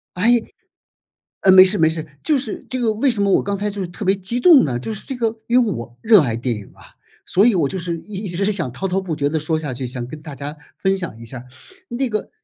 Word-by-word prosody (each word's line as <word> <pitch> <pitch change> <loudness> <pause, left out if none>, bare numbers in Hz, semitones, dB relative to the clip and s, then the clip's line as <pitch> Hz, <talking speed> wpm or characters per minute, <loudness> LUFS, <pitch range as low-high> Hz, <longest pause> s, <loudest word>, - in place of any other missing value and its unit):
诶 230 +6 +3 1.0
呃， 190 - +6
没 185 0 +10
事， 190 +2 +2
没 160 -1 +4
事。 160 0 -4 0.2
就 300 -3 +2
是 245 -5 -5
这 255 - -3
个 225 -2 +1
为 255 +5 +2
什 205 -4 -1
么 200 - +2
我 - - +3
刚 200 0 -2
才 205 +1 -2
就 200 0 -6
是 185 - -2
特 175 +4 -7
别 190 +1 +3
激 200 +5 -1
动 305 0 +7
呢， 125 -4 -2
就 125 - -5
是 210 - -6
这 265 - -4
个 230 -2 -1
因 245 +1 +4
为 210 - -1
我 115 +1 -8
热 220 -6 +6
爱 115 -4 -1
电 120 0 -2
影 105 -2 -9
啊， - - -18 0.4
所 195 - +3
以 235 -2 +4
我 160 -7 +1
就 190 - -4
是 170 -1 -3
一 205 +2 -7
直 195 +3 0
想 170 -11 -1
滔 195 +9 -3
滔 190 +1 0
不 185 -4 -4
绝 145 -1 0
地 160 +2 -1
说 155 +1 -1
下 150 -4 -4
去， 125 0 -4
想 125 -1 -5
跟 150 +4 -10
大 150 -3 -8
家 145 +2 -7 0.2
分 195 0 +1
享 175 - -6
一 115 - -10
下 125 +3 -8
儿， 125 - -12 0.4
那 255 +2 -2
个 215 -1 -3
190 Hz, 300 characters per minute, -20 LUFS, 150-215 Hz, 1.0 s, 没